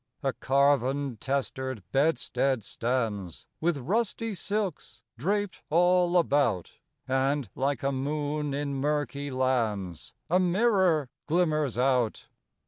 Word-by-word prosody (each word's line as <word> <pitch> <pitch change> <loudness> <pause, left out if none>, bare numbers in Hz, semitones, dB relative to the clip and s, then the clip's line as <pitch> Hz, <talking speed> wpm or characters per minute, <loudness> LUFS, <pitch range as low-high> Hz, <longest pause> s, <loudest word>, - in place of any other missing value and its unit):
A 135 -1 +1
carven, 140 -1 +1
testered 130 -2 -3
bedstead 135 -4 +1
stands 110 - -2
With 165 -1 +1
rusty 220 - -1
silks 180 - -3
draped 200 - -1
all 180 +2 +4
about; 140 - +1 0.3
And, 135 0 +1
like 135 -1 -1
a 140 - +1
moon 145 +2 -2
in 145 0 -2
murky 145 0 -1
lands, 115 - -1
A 180 +3 +3
mirror 185 - +2 0.2
glimmers 155 -6 +1
out. 125 -3 +1
140 Hz, 105 wpm, -28 LUFS, 130-165 Hz, 0.3 s, all